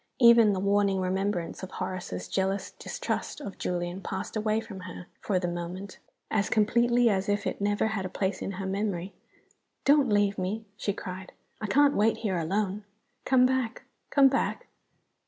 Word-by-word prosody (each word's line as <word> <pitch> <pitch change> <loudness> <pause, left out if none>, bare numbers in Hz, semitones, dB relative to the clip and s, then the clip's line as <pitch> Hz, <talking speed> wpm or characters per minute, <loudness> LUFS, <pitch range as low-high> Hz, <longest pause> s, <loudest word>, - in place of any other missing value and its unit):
Even 235 -3 +7
the 190 - -1
warning 200 0 +2
remembrance 185 -2 -1
of 190 - -6
Horace's 185 - -4
jealous 190 - -1
distrust - - -4
of 200 -10 -8
Julian 175 +1 -2
passed 190 +2 -5
away 215 0 +1
from 205 -4 -8
her, 180 -1 -8
for 195 - 0
the 180 -1 -1
moment, 175 +3 -5 0.3
as 210 -2 +1
completely 235 +3 +3
as 195 -1 +1
if 205 0 0
it - - -3
never 205 +1 +1
had 215 -3 -2
a 185 - -4
place 190 0 -2
in 195 - -3
her 190 +1 -5
memory. 195 -1 -2 0.7
"Don't 285 -3 +5
leave 205 -1 +2
me!" 205 +5 -2
she 205 - -1
cried. 185 -1 -7 0.3
"I 215 - -2
can't 285 +5 +4
wait 220 +2 +2
here 190 -4 +1
alone. 195 +4 -1 0.4
Come 255 -1 +5
back 255 -3 0 0.3
come 280 -2 +6
back!" 270 +1 0
200 Hz, 170 wpm, -28 LUFS, 185-220 Hz, 0.7 s, Even